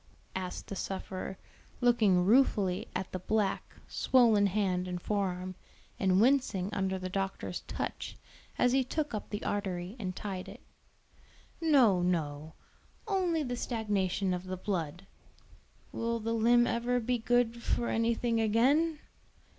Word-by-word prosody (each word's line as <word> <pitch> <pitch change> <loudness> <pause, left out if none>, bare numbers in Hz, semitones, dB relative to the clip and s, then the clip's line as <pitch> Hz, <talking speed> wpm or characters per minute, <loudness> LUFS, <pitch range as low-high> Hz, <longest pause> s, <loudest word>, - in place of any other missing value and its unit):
asked 185 -1 -4
the 200 - -6
sufferer, 190 0 -5 0.4
looking 220 -7 +4
ruefully 205 -5 +3
at 185 0 -3
the 185 - -3
black, 205 +1 -1
swollen 225 -6 +4
hand 185 -2 0
and 180 -1 -3
fore 200 +1 0
arm, 185 0 -5 0.5
and 190 -1 +3
wincing 225 -6 +2
under 190 -1 0
the 185 0 -4
doctor's 195 +1 -3
touch - - -4 0.4
as 245 - +3
he 265 +1 +3
took 295 +2 -3
up 210 - -4
the 205 - -4
artery 190 -1 -3
and 185 -4 -4
tied 190 -3 -5
it. - - -12 1.0
"No, 255 - +5
no; 160 -3 -2 0.5
only 360 -6 +1
the 245 -2 -3
stagnation 200 -6 -1
of 180 +1 -4
the 185 0 -4
blood." 180 -2 -3 0.9
"Will 230 0 -2
the 230 +1 -2
limb 240 +2 +4
ever 240 +1 0
be 245 +1 -1
good 235 0 +1
for 235 - 0
anything 230 0 +1
again?" 275 +9 +3
205 Hz, 140 wpm, -31 LUFS, 185-240 Hz, 1.0 s, No